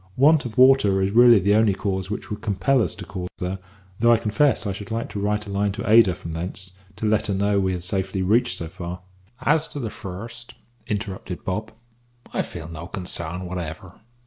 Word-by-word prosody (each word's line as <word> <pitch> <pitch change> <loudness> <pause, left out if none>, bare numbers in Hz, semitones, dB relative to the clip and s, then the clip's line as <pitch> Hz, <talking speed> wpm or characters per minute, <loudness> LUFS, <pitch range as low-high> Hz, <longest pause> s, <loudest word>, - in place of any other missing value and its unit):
Want 150 +2 +5
of 120 0 -6
water 130 -7 +6
is 95 - 0
really 120 +1 +7
the 100 +1 +3
only 105 -2 +4
cause 95 -1 -2
which 105 - -5
would 105 0 -4
compel 110 +6 +2
us 95 - -1
to - - -8
call 90 -1 -5
there, 90 +1 -3 0.4
though 120 +1 +5
I 115 - +6
confess 120 +5 +1
I 100 - -1
should 100 0 -7
like 115 +1 -3
to 105 - -5
write 105 +1 -1
a 100 - -7
line 100 +1 +1
to 115 - -5
Ada 110 -4 +6
from 85 - -8
thence, 90 +3 -5 0.2
to - - -4
let 110 0 +2
her 100 - 0
know 100 +1 +2
we 95 -1 +1
had 90 -1 -4
safely 95 +1 -1
reached 115 +6 +2
so 85 - -5
far 90 0 -7 0.2
" 120 +6 -32
"As 160 0 0
to 145 - -7
the 115 -5 -4
first," 115 +5 -8 0.3
interrupted 100 -4 -4
Bob, 105 +4 -3 0.6
"I - - +1
feel 80 - -7
no 85 0 -8
consarn 90 -2 -3
whatever. 90 +1 -7
100 Hz, 215 wpm, -23 LUFS, 95-115 Hz, 0.6 s, really